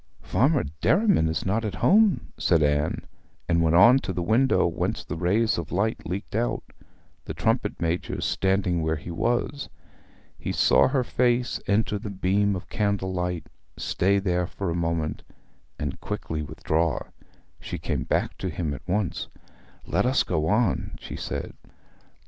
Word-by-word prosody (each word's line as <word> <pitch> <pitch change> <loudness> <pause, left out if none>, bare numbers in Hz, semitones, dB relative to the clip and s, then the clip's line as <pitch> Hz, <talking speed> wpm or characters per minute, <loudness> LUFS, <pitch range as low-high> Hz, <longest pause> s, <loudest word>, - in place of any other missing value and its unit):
Farmer 140 +2 +2 0.2
Derriman 195 - +3
is 80 - -2
not 105 +4 0
at 105 -4 -3
home,' 205 - +3
said 85 -3 +2
Anne, 75 +1 0 0.4
and 85 -1 +2
went 80 0 +3
on 115 +9 +7
to 100 - -4
the 90 -1 -2
window 120 +8 +3
whence - - -1
the 75 - -4
rays 95 +6 +1
of 80 - -6
light 105 +2 -1
leaked 95 +4 -5
out, - - -1 0.6
the - - -5
trumpet - - 0
major 85 +1 -2
standing 95 -3 +1
where 80 0 0
he 80 +3 -7
was. 120 - -1 0.7
He - - -3
saw - - +5
her 130 -1 +1
face 120 0 +1
enter 105 0 +1
the 105 0 -6
beam 100 +1 +1
of 90 - -7
candlelight, 95 -4 -1 0.3
stay 100 +2 +1
there 90 -3 0
for 95 -2 -4
a - - -2
moment, 85 -2 -1 0.6
and 70 -3 -4
quickly 80 -1 -4
withdraw. 80 +2 -1 0.6
She - - -5
came - - -2
back - - -1
to 95 - -2
him 80 -2 -3
at 70 - -7
once. 95 0 -1 0.6
'Let - - +1
us 130 - +3
go 80 -3 -1
on,' 110 +5 +1
she - - -8
said. - - -4
95 Hz, 155 wpm, -25 LUFS, 85-110 Hz, 0.7 s, on